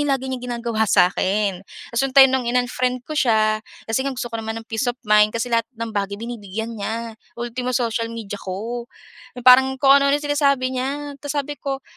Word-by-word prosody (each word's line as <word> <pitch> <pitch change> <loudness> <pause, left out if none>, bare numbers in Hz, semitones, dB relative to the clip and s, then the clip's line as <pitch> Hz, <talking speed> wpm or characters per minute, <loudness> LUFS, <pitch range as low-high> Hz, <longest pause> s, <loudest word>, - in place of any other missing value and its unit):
yung - - +2
lagi 265 - -9
niyang 250 -1 -5
ginagawa 235 -2 -1
sa 180 +1 +4
akin. 195 -1 0 0.3
Ta’s 235 - +1
yung 265 - -13
time 270 -1 +9
nung 255 -2 0
in-unfriend 250 0 0
ko 310 - -7
siya, 215 -6 +2 0.2
kasi 225 +3 -1
nga 275 0 -2
gusto 240 -2 -5
ko 230 - -3
naman 220 0 -5
ng 225 - -12
peace 225 +2 -2
of 245 - -2
mind 210 0 +5
kasi 235 +1 -3
lahat 230 -1 +1
ng 230 -1 -5
bagay 200 0 -2
binibigyan 220 -1 -6
niya. 225 +2 -4 0.2
Ultimo 245 +1 -2
social 230 -1 -1
media 215 -3 -7
ko 230 +6 -5 0.5
na 245 - -8
parang 265 +1 +7
kung 275 +1 +6
ano-ano 280 +1 +3
na 295 - -7
sinasabi 280 -3 +1
niya. 255 - -1 0.4
Tas 290 0 -5
sabi 290 0 -3
ko 270 -1 -4
235 Hz, 210 wpm, -21 LUFS, 220-260 Hz, 0.5 s, time